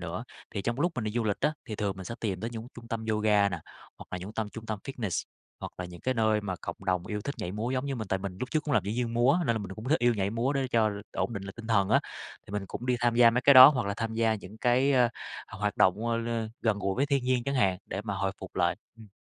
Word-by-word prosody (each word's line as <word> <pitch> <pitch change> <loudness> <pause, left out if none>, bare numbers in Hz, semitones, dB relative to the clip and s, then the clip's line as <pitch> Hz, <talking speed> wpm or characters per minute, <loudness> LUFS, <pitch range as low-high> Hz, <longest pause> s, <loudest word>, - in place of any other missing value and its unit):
nữa, - - -5 0.3
thì 100 - -4
trong 120 +6 -2
lúc 175 +1 +2
mình 125 - -3
đi 105 - -1
du 115 0 0
lịch 105 -2 -1
á 150 +2 +2
thì 110 - -5
thường 100 -2 -2
mình 95 -2 -8
tìm 95 -5 -2
tới 115 +3 -3
những 115 -1 -7
trung 120 -1 -11
tâm 115 -2 -3
yoga 105 -1 +3
nà, - - -4 0.4
hoặc - - -10
là 90 - -3
những 95 +4 -8
tâm 110 -1 -2
trung 115 +1 -9
tâm 110 -2 -3
fitness, 115 -10 -3 0.4
hoặc - - -6
là 90 - -3
những 90 -1 -10
cái 130 - 0
nơi 110 -2 +2
mà 100 -3 -3
cộng 85 - -5
đồng 90 -2 0
yêu 105 -1 -3
thích 140 +7 -4
nhảy 90 - -4
múa 110 +4 -2
giống 130 +1 -1
như 140 - -2
mình. 110 -5 -5
Tại 95 - 0
mình 95 -1 -6
lúc 125 - -3
trước 155 - +1
cũng 145 -3 0
là - - +5
diễn 105 +2 -2
viên 120 -1 -1
múa, 125 +7 +4
nên 115 - +2
là - - 0
mình 100 -2 -6
cũng 110 +3 -7
thích 155 - +3
yêu 120 0 +3
nhảy 100 -2 0
múa, 115 +5 0
để 135 -2 0
cho 110 -3 +3 0.2
ổn - - -1
định 100 -4 -4
lại 95 - -7
tinh 115 - -9
thần 100 -4 +2
á, - - +4 0.5
thì - - -11
mình 105 -1 -3
cũng 120 - -6
đi 125 -1 +2
tham 120 -1 +2
gia 120 -1 +7
mấy 120 +2 +1
cái 140 +2 +6
đó 130 0 +13
hoặc 125 -7 0
là 100 - -1
tham 115 0 -3
gia 115 -1 +2
những 105 0 -10
cái, 125 +4 +3
ơ, 125 -2 +5 0.4
hoặc 100 - -9
hoạt 105 0 -1
động, 105 +5 +3
ơ, 115 - +1
lên 115 -1 -2
gần 110 -3 +1
gũi 95 -1 -1
với 140 +2 +2
thiên 140 -3 +1
nhiên 125 -1 +2
chẳng 140 - -1
hạn 95 -8 +2
để 95 - -4
mà 105 -3 -2
hồi 95 0 -1
phục - - -9
lại, - - +2 0.2
ừm. 110 -2 -14
110 Hz, 310 wpm, -29 LUFS, 100-125 Hz, 0.5 s, đó